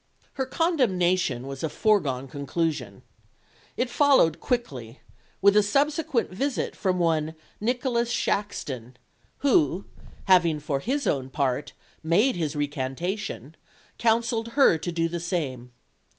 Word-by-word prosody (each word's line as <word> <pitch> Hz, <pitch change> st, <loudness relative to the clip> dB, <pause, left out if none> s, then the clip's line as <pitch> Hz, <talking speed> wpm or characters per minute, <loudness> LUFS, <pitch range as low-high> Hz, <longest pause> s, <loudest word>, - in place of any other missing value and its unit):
Her 265 Hz, -1 st, -2 dB
condemnation 185 Hz, -, +1 dB
was 135 Hz, 0 st, -7 dB
a 160 Hz, -, 0 dB
foregone 145 Hz, -11 st, +1 dB
conclusion. 145 Hz, +4 st, -3 dB, 0.7 s
It 250 Hz, -, +1 dB
followed 260 Hz, -, +4 dB
quickly, 135 Hz, -, -3 dB, 0.4 s
with 200 Hz, 0 st, +6 dB
a 210 Hz, -, +7 dB
subsequent 280 Hz, -, 0 dB
visit 270 Hz, +8 st, -2 dB
from 185 Hz, -3 st, 0 dB
one 160 Hz, -2 st, 0 dB, 0.2 s
Nicholas 240 Hz, +1 st, 0 dB
Shaxton, 135 Hz, -, -2 dB, 0.5 s
who, 180 Hz, -, +3 dB, 0.4 s
having, 175 Hz, -5 st, +4 dB
for 145 Hz, -2 st, -2 dB
his 270 Hz, -, -2 dB
own 135 Hz, -2 st, 0 dB
part, 140 Hz, 0 st, -1 dB, 0.3 s
made 190 Hz, +11 st, +2 dB
his 160 Hz, -3 st, -2 dB
recantation, 145 Hz, -, -3 dB, 0.5 s
counselled 230 Hz, 0 st, +1 dB
her 220 Hz, -, +5 dB
to 175 Hz, +3 st, -3 dB
do 165 Hz, 0 st, 0 dB
the 170 Hz, +1 st, -4 dB
same. 145 Hz, -8 st, -3 dB
175 Hz, 120 wpm, -26 LUFS, 145-230 Hz, 0.7 s, a